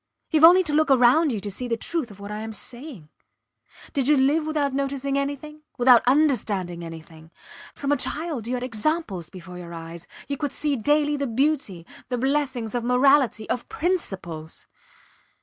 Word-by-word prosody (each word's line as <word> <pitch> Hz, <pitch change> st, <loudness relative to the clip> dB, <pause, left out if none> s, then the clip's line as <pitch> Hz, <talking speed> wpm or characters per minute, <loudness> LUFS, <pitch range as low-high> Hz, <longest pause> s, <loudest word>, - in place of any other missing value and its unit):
Youve 315 Hz, -1 st, +3 dB
only 360 Hz, +3 st, +7 dB
to 305 Hz, -4 st, -3 dB
look 310 Hz, 0 st, +3 dB
round 270 Hz, +4 st, +5 dB
you 220 Hz, -, -2 dB
to 205 Hz, 0 st, -5 dB
see 245 Hz, +6 st, -4 dB
the 230 Hz, -1 st, -1 dB
truth 320 Hz, +1 st, -3 dB
of 205 Hz, -1 st, -14 dB
what 200 Hz, +1 st, -8 dB
I 210 Hz, -, -4 dB
am 220 Hz, 0 st, -6 dB
saying. 240 Hz, -, -6 dB, 0.8 s
Did 270 Hz, -2 st, 0 dB
you 300 Hz, -1 st, +5 dB
live 295 Hz, +4 st, +2 dB
without 295 Hz, -3 st, 0 dB
noticing 275 Hz, 0 st, -2 dB
anything, 285 Hz, +2 st, -4 dB, 0.2 s
without 245 Hz, -1 st, +6 dB
understanding 210 Hz, -, +1 dB
anything? 160 Hz, -1 st, -11 dB, 0.5 s
From 280 Hz, 0 st, -2 dB
a 290 Hz, -, +3 dB
child 295 Hz, -4 st, -3 dB
you 250 Hz, -, -1 dB
had 245 Hz, -, -4 dB
examples 230 Hz, -, -2 dB
before 180 Hz, -1 st, -10 dB
your 170 Hz, -1 st, -9 dB
eyes 165 Hz, +1 st, -9 dB, 0.2 s
you 280 Hz, 0 st, -3 dB
could 290 Hz, -2 st, -3 dB
see 295 Hz, -2 st, 0 dB
daily 295 Hz, +4 st, +1 dB
the 280 Hz, -1 st, -2 dB
beauty, 245 Hz, -, -1 dB, 0.2 s
the 250 Hz, -, -1 dB
blessings 265 Hz, -3 st, -1 dB
of 240 Hz, -1 st, -2 dB
morality, 250 Hz, -2 st, +3 dB
of 250 Hz, -, -3 dB
principles. 195 Hz, -, -4 dB
255 Hz, 175 wpm, -24 LUFS, 205-295 Hz, 0.8 s, only